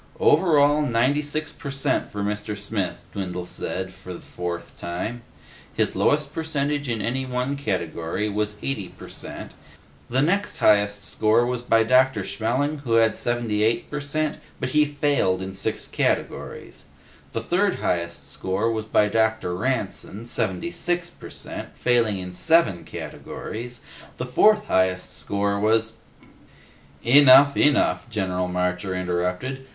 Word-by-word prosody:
"Over 190 - +4
all, 145 +1 +4
ninety 130 +2 +2
six 155 +1 -3
per 140 - -7
cent 135 0 0
for 100 0 -5
Mr. 105 0 -3
Smith," 100 -3 -3
Dwindle 90 -3 -4
said 95 +1 -4
for 90 -1 -9
the - - -9
fourth 85 -1 -6
time. 100 +8 -4 0.5
"His - - 0
lowest 150 0 +1
percentage 145 -3 -2
in 115 -3 -2
any 130 +3 -1
one 125 +2 -2
category 90 - -2
was 105 0 -2
eighty 105 -9 -3
per - - -12
cent. - - -9 0.6
The 130 +3 +2
next 195 +6 0
highest 100 -1 +3
score 110 +3 +3
was 125 -1 -2
by 115 -2 +3
Dr. 130 -2 +3
Schmelling, 125 +10 -1
who 125 -5 -2
had 115 -1 +4
seventy 120 -3 0
eight 115 +2 +1
per 150 - -2
cent, 155 +2 -2 0.2
but 130 - -2
he 150 +2 +4
failed 145 -10 +1
in 95 0 -5
six 95 - -1
categories. - - -2 0.5
The 115 - -3
third 180 - +1
highest 85 -1 -2
score 95 +5 -1
was 110 -1 -3
by 105 -1 +3
Dr. 110 -4 +1
Ranson, 110 -1 -3
seventy 110 - -1
six 175 0 -1
per - - -12
cent, - - -8
failing 115 -5 +2
in 90 -1 -6
seven 160 - +3
categories. 120 +2 -7 0.4
The 125 - -3
fourth 210 +11 +4
highest 95 - +1
score 100 0 -1
was 110 +1 +2 0.6
" - - -27
"Enough. 140 +2 +8
Enough," 145 -4 +2
General 90 -4 -1
Marcher 90 +1 -1
interrupted. 90 +9 -2
115 Hz, 145 wpm, -24 LUFS, 95-140 Hz, 0.6 s, Enough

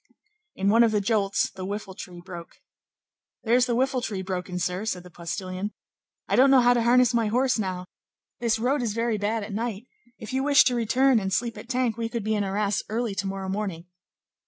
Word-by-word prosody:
In 195 +1 +1
one 230 +3 +6
of 230 - +3
the 210 - +2
jolts, 200 -1 +1
the 190 - -8
whiffle 200 0 -5
tree 180 -1 -9
broke. 175 -2 -10 0.9
"There's 245 +2 +3
the 240 - 0
whiffle 260 +1 +1
tree 200 -6 -3
broken, 185 -1 -4
sir," 180 +3 -2
said 185 -5 -3
the 180 - -14
postilion; 185 +4 -5 0.5
"I - - +1
don't 265 +2 +6
know 265 -1 +6
how 245 0 +5
to 240 - +1
harness 245 +1 +4
my 230 -2 +2
horse 250 +2 +1
now; 185 -3 -3 0.5
this 230 -2 +1
road 255 +5 +1
is 230 -4 -1
very 230 -2 0
bad 215 +2 -1
at 200 0 -7
night; 225 0 -3 0.3
if 220 +4 -8
you 265 - +1
wish 285 +1 +6
to 255 - +1
return 245 +2 +3
and 190 -2 -3
sleep 230 +4 -1
at 235 - -11
Tinques, 250 -3 0
we 230 0 -2
could 230 -2 -3
be 215 +1 0
in 210 -1 +1
Arras 200 +1 0
early 225 0 -1
to 195 0 -2
morrow 195 0 -4
morning." 190 -4 -3
215 Hz, 215 wpm, -26 LUFS, 195-240 Hz, 0.9 s, one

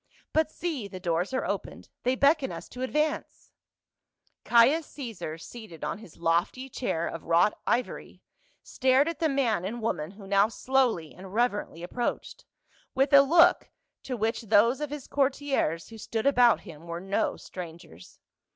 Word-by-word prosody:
But 315 -1 +2
see, 310 -10 -4
the 185 -2 -8
doors 175 +2 -1
are 260 - -1
opened! - - -5
They 255 +1 +1
beckon 280 0 +3
us - - -7
to 250 - -9
advance 300 +4 -2 0.5
!" - - -46
Caius 265 +7 +4
Caesar, 225 - -6
seated 175 -3 -11
on 150 +7 -3
his 200 -7 -14
lofty 170 +11 0
chair 170 -10 -2
of 165 - -7
wrought 170 +5 +3
ivory, 245 - -2 0.4
stared 265 +3 +2
at 335 - -3
the 320 - +2
man 245 -10 +1
and 220 +6 -4
woman 165 -9 -2
who 200 +1 -13
now 200 +1 +4
slowly 235 - 0
and 190 +2 -11
reverently 205 -8 -1
approached, 240 +7 -4 0.5
with 270 +2 +2
a 280 - +10
look 335 +5 +5 0.3
to 255 -2 -4
which 225 +2 -1
those 230 +4 +3
of 300 - -2
his 295 -2 -6
courtiers 270 - 0
who 225 -1 -11
stood 220 +2 -3
about 245 -4 +5
him 165 -3 -12
were 170 0 -4
no 195 +2 -1
strangers. 165 - -10
230 Hz, 160 wpm, -28 LUFS, 180-270 Hz, 0.5 s, a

